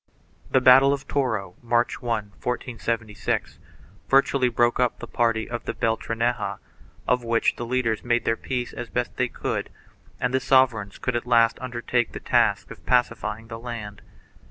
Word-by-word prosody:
The 130 - +3
battle 135 +2 +7
of 140 -1 -5
Toro, 110 -10 -1
March 120 0 +1
1T 110 -5 -4
1476, 115 -3 -3 0.5
virtually 135 -1 +4
broke 120 0 +2
up 125 -1 +1
the - - -7
party 115 -2 0
of 120 0 -5
the - - -3
Beltraneja, 115 +1 -1 0.5
of 125 -1 +2
which 115 0 +1
the 120 - -5
leaders 115 -3 0
made 120 -1 +1
their 115 - +2
peace 125 0 -4
as 120 - -6
best 125 0 -2
they 125 - +2
could, - - -3 0.5
and 125 +1 -1
the 130 - +3
sover 130 -5 +4
eigns 100 0 -14
could 125 - -2
at 120 +1 -2
last 115 -2 +4
undertake 120 -1 -1
the - - -5
task - - +1
of - - -11
pacifying 115 -2 0
the 115 0 -7
land. 110 -4 -7
120 Hz, 165 wpm, -24 LUFS, 115-125 Hz, 0.5 s, battle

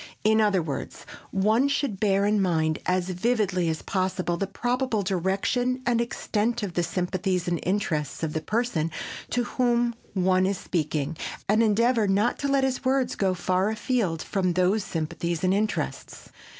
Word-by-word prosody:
In 220 +1 +4
other 200 -5 +2
words, 145 -4 -5 0.2
one 215 +7 +2
should 280 -8 -1
bear 200 -1 +2
in 210 0 +2
mind 160 -4 +1
as 180 0 +1
vividly 185 -3 +1
as 160 -1 -3
possible 185 -2 -1
the 195 +3 -2
probable 245 +1 -1
direction 195 +8 0
and 235 -1 +2
extent 235 0 -1
of 190 -4 -3
the 175 - +1
sympathies 180 +1 -1
and 175 -1 0
interests 165 -7 -1
of 155 -1 -1
the 155 - -1
person 210 -5 0 0.4
to 245 - 0
whom 240 -2 +1 0.2
one 185 0 +3
is 195 -1 -1
speaking 155 -2 -2 0.3
and 215 +3 +3
endeavor 230 +1 +3
not 200 +4 +1
to 280 - -1
let 275 -1 +2
his 265 0 -1
words 260 -1 +1
go 190 -2 +1
far 185 +3 +1
afield 220 -7 -1
from 185 -3 0
those 185 +4 +2
sympathies 165 +1 -3
and 185 0 +3
interests. 210 +2 -3
195 Hz, 165 wpm, -26 LUFS, 180-235 Hz, 0.4 s, In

